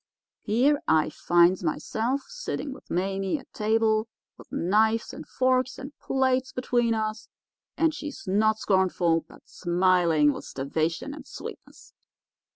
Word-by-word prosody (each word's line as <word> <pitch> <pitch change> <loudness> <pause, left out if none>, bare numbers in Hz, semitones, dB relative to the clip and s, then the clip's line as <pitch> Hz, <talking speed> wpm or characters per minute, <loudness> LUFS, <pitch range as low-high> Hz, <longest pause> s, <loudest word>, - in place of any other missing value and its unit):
Here 265 +8 +2
I 155 -1 +3
finds 175 +3 +3
myself 225 - -1
sitting 485 - -5
with - - -15
Mame 195 - -1
at 265 - -15
table, 220 0 +1 0.3
with - - -16
knives 220 +5 +1
and - - -9
forks 255 0 +1
and 275 +2 -9
plates 260 -1 0
between 240 -2 +1
us, 215 0 -3 0.5
and 325 -1 +2
she 300 0 -5
not 215 +3 +2
scornful, 185 -5 +2
but - - -17
smiling 175 -4 +2
with - - -8
starvation 160 - -2
and 295 - -11
sweetness. - - -10
215 Hz, 130 wpm, -26 LUFS, 180-255 Hz, 0.5 s, I